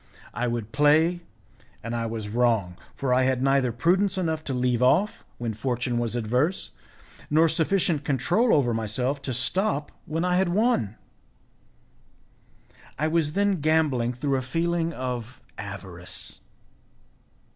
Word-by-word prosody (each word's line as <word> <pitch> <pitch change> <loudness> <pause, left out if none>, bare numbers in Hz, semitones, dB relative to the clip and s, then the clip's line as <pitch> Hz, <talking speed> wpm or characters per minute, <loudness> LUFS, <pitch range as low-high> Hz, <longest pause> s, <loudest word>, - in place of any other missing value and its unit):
I 120 +3 -1
would 115 -2 -3
play, 155 +5 +3 0.6
and 115 +1 -3
I 115 -1 -1
was 110 -2 -5
wrong, 110 -5 +1 0.2
for 130 -2 0
I 130 - +4
had 130 0 +1
neither 135 -2 +3
prudence 185 - +2
enough 160 -4 -1
to 135 - -2
leave 125 -1 +1
off 185 +12 +2
when 115 -2 -3
fortune 125 +1 -1
was 120 -1 -2
adverse, 125 - 0 0.6
nor 160 +2 +5
sufficient 160 -1 +1
control 175 - +2
over 125 -5 +3
myself 125 +6 -2
to 135 - -4
stop 145 - 0 0.2
when 165 +3 -1
I 180 0 +2
had 190 -1 +2
won. 190 - +1 2.0
I 155 - +1
was 155 -2 +1
then 200 -3 +1
gambling 145 -6 +2
through 135 +2 -1
a - - -1
feeling 165 +5 -1
of 125 -4 -5 0.2
avarice. 95 -3 -5
135 Hz, 135 wpm, -25 LUFS, 120-165 Hz, 2.0 s, nor